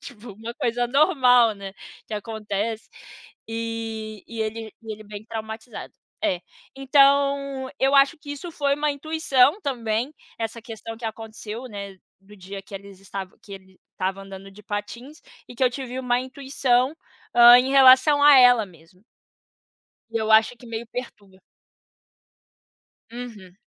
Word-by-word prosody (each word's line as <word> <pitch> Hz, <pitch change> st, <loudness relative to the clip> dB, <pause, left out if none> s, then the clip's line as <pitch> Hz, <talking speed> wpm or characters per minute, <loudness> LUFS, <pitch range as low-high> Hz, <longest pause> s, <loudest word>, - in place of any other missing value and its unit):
Tipo 225 Hz, -2 st, -11 dB
uma 225 Hz, +4 st, -8 dB
coisa 240 Hz, +1 st, -1 dB
normal, 250 Hz, -, +4 dB
né, 195 Hz, -1 st, -9 dB, 0.3 s
que 215 Hz, -, -6 dB
acontece, 215 Hz, 0 st, -4 dB, 0.6 s
e 225 Hz, -2 st, -5 dB
e 230 Hz, -1 st, -6 dB
ele 220 Hz, 0 st, -5 dB
e 220 Hz, -1 st, -6 dB
ele 215 Hz, -, -10 dB
bem 205 Hz, 0 st, -9 dB
traumatizado. 220 Hz, +1 st, -7 dB, 0.3 s
É, 180 Hz, -2 st, 0 dB, 0.4 s
então 275 Hz, -1 st, +2 dB
eu 270 Hz, +1 st, +2 dB
acho 275 Hz, +3 st, +4 dB
que 290 Hz, -, -10 dB
isso 340 Hz, +5 st, -8 dB
foi 280 Hz, -2 st, 0 dB
uma 295 Hz, +1 st, 0 dB
intuição 290 Hz, +2 st, +2 dB
também, 240 Hz, -1 st, -2 dB, 0.3 s
essa 225 Hz, 0 st, -4 dB
questão 225 Hz, 0 st, -8 dB
que 230 Hz, -, -11 dB
aconteceu 220 Hz, +1 st, -7 dB
né, 200 Hz, -2 st, -8 dB, 0.2 s
do 205 Hz, +2 st, -17 dB
dia 195 Hz, +1 st, -8 dB
que 195 Hz, -, -13 dB
eles 195 Hz, -1 st, -10 dB
estava 195 Hz, -1 st, -8 dB
que 200 Hz, -, -13 dB
ele 190 Hz, -1 st, -13 dB, 0.2 s
tava 190 Hz, +1 st, -3 dB
andando 195 Hz, 0 st, -11 dB
de 210 Hz, +2 st, -15 dB
patins, 235 Hz, +9 st, -7 dB, 0.3 s
e 245 Hz, -, -12 dB
que 260 Hz, -, -4 dB
eu 250 Hz, -, +3 dB
tive 255 Hz, -1 st, -6 dB
uma 245 Hz, -1 st, 0 dB
intuição, 265 Hz, +1 st, 0 dB, 0.4 s
hã, 240 Hz, 0 st, +9 dB
em 260 Hz, +2 st, 0 dB
relação 270 Hz, +2 st, +6 dB
a 290 Hz, -1 st, +8 dB
ela 245 Hz, -3 st, +6 dB
mesmo. 180 Hz, +2 st, -21 dB, 1.1 s
E 230 Hz, -, -3 dB
eu 220 Hz, -1 st, -1 dB
acho 220 Hz, +2 st, +5 dB
que 245 Hz, -, -15 dB
meio 230 Hz, 0 st, -6 dB
perturba. 205 Hz, -6 st, -9 dB, 1.7 s
Uhum. 220 Hz, -7 st, -10 dB
230 Hz, 150 wpm, -23 LUFS, 210-260 Hz, 1.7 s, hã